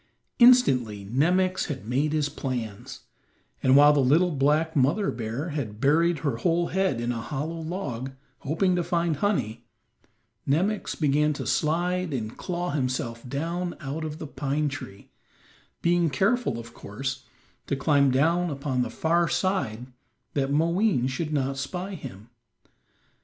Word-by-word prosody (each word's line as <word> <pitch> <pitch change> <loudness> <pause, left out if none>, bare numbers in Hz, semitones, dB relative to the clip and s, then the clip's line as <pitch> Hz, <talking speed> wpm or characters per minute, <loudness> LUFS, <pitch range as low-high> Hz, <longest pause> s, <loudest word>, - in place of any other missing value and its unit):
Instantly 130 - +5
Nemox 180 - +1
had 135 -8 -5
made 140 +5 +1
his 150 -2 +1
plans, 120 -8 -5 0.6
and 130 0 +4
while 145 +1 +8
the 145 - +2
little 155 +7 +4
black 150 +3 +1
mother 150 +10 +2
bear 120 +8 -4
had 120 -9 -4
buried 165 +6 +3
her 135 -5 0
whole 170 +6 +1
head 190 -9 0
in 120 +1 -1
a 115 -2 -3
hollow 150 +7 -4
log, 145 -7 -4 0.3
hoping 180 +6 +1
to 175 - 0
find 170 -2 0
honey, 120 - -1 0.8
Nemox 190 +9 0
began 150 0 +2
to - - -6
slide 175 +1 0
and 110 -3 -4
claw 180 -1 -3
himself 125 -4 -3
down 170 +6 -3
out 145 +3 -5
of 155 -1 -5
the 160 - -6
pine 145 +1 -1
tree, 100 -8 -9 0.7
being 170 -1 +3
careful, 195 - +1
of 115 0 -9
course, 130 +5 -5 0.4
to 140 - 0
climb 140 0 +3
down 165 +7 +2
upon 140 -3 -2
the 120 - -1
far 170 +7 +1
side 130 - -1 0.5
that 135 -2 0
Moween 170 - +2
should 150 +4 -3
not 135 -2 -1
spy 180 +8 -4
him. 120 - -9
145 Hz, 145 wpm, -26 LUFS, 130-170 Hz, 0.8 s, while